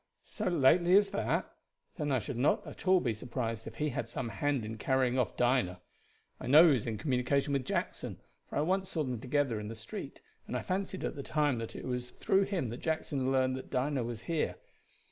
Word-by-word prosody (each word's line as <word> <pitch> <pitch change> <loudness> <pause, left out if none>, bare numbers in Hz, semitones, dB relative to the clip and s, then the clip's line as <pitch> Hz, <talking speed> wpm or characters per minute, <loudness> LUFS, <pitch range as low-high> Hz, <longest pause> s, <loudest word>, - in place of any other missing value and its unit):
"So - - -4
lately 175 +3 +5
as 200 -1 +3
that! 200 - -1 0.4
Then 150 -4 -2
I 130 - +3
should 130 +2 -4
not 125 +5 +2
be - - -8
at - - -11
all 185 -4 +5
surprised 115 -1 -4
if 115 - -8
he 150 +6 0
had 120 -3 -3
some 120 0 -3
hand 140 -2 -1
in 110 0 -6
carrying 130 0 +2
off 125 - -1
Dinah. 120 -8 +2 0.6
I - - -6
know 150 +5 +9
he 165 - +6
was 120 -4 -1
in 110 -2 -2
communication 140 +1 +1
with 135 -2 0
Jackson, - - -3 0.3
for - - -4
I - - +3
once 190 +4 0
saw 160 - -1
them 125 -4 -3
together 130 -3 0
in 105 - -5
the 115 - -6
street, 110 0 -7 0.3
and - - -2
I - - -4
fancied 190 0 -2
at - - -1
the 140 - -5
time 145 -3 +1
that 115 - -6
it - - -6
was 125 -1 -3
through 195 +8 +2
him 185 - -2
that 120 - -5
Jackson 145 -5 -1
learned 130 -1 +2
that 130 - -8
Dinah 130 0 0
was 115 -2 -5
here. 160 +6 -1
130 Hz, 220 wpm, -32 LUFS, 120-155 Hz, 0.6 s, know